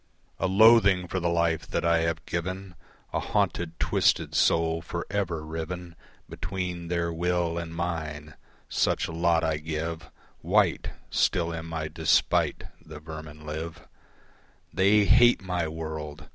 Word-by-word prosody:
A 95 - +1
loathing 100 -2 +6
for 95 - -2
the 85 -1 0
life 85 -1 +1
that - - -2
I 85 0 +4
have 80 -1 -1
given, 95 +2 -4 0.4
A - - +1
haunted, 85 -1 -1
twisted - - +2
soul 80 0 +2
for 85 +1 -5
ever 85 -6 -2
riven 85 +2 -6 0.3
Between 90 -1 -4
their 85 -1 -1
will 85 0 0
and 85 -1 -6
mine 80 -3 -4 0.3
such - - +1
lot 85 0 +1
I 80 -1 +1
give 80 +1 -4 0.3
White - - +2 0.2
still 85 -2 +1
in 80 0 -6
my 80 -1 -3
despite - - +1 0.2
the 80 -2 -10
vermin 75 -1 -9
live. 80 +2 -6 0.9
They 100 +2 +4
hate 120 0 +5
my 90 -3 -1
world! 80 -1 -6
85 Hz, 135 wpm, -27 LUFS, 80-90 Hz, 0.9 s, loathing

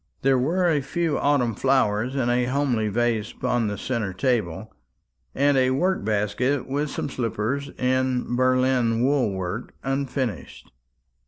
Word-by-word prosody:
There 135 -1 +4
were 175 +8 +1
a 155 -4 +2
few 160 +3 -1
autumn 140 -5 +2
flowers 130 -1 +1
in 130 -3 0
a 120 0 +2
homely 125 -4 0
vase 115 0 0
upon 120 -3 0
the 105 0 -3
centre 115 -7 -2
table, 105 -6 -1 0.6
and 140 +1 +3
a 130 -1 +3
work 180 - 0
basket 110 +6 0
with 145 +3 -1
some - - -3
slippers, 130 +2 -2
in 130 -1 0
Berlin 130 -2 +2
wool 130 -5 +2
work, 95 +4 -5
unfinished. 135 - -3
130 Hz, 140 wpm, -24 LUFS, 115-135 Hz, 0.6 s, There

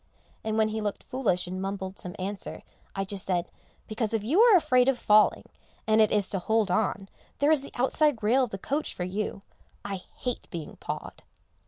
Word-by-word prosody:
and 220 0 -1
when 220 0 +3
he 220 0 -3
looked 205 -1 -3
foolish 215 -9 -1
and 185 +1 -5
mumbled 195 0 -4
some 180 - -7
answer, 195 +2 -5 0.3
I 195 0 -1
just 195 -1 -1
said, 175 -2 -1 0.4
"Because 220 0 -2
if 215 - -1
you 305 - +3
are 460 -5 +8
afraid 255 -6 +3
of 270 -2 +3
falling, 215 -2 +4 0.4
and 220 0 +4
it 215 - +4
is 205 -2 +2
to 195 - -1
hold 220 +1 +1
on, 195 0 0 0.3
there 290 +2 +3
is 305 -3 +4
the 280 - -8
outside 265 -1 +2
rail 250 +5 +4
of 250 - -1
the 195 - -5
coach 285 +10 -3
for 180 - -3
you; 195 +2 -3 0.4
I 200 -1 -3 0.2
hate 250 -1 -4
being 165 -4 -7
pawed." - - -6
215 Hz, 200 wpm, -27 LUFS, 195-250 Hz, 0.4 s, are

